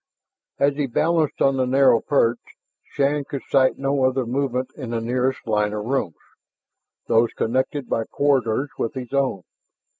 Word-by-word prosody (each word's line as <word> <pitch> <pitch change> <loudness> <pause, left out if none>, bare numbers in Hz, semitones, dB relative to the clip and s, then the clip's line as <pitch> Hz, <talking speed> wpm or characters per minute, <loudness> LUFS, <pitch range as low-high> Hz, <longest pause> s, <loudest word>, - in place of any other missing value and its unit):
As 140 0 +2
he 145 -2 0
balanced 155 +4 +1
on 135 -1 +3
the 130 -1 +1
narrow 130 -2 +4
perch, 120 -4 +1 0.5
Shann 140 +1 0
could 140 -1 -6
sight 130 -1 +3
no 135 0 0
other 130 -1 +1
movement 130 0 -2
in 130 -6 -7
the 115 -1 -1
nearest 125 +3 -1
line 105 -2 0
of 105 0 -4
rooms, 120 - -2 0.9
those 115 0 +3
connected 130 +3 -1
by 115 - -1
corridors 135 -1 0
with 115 - -2
his 130 0 -7
own. 135 -9 0
130 Hz, 155 wpm, -22 LUFS, 115-140 Hz, 0.9 s, narrow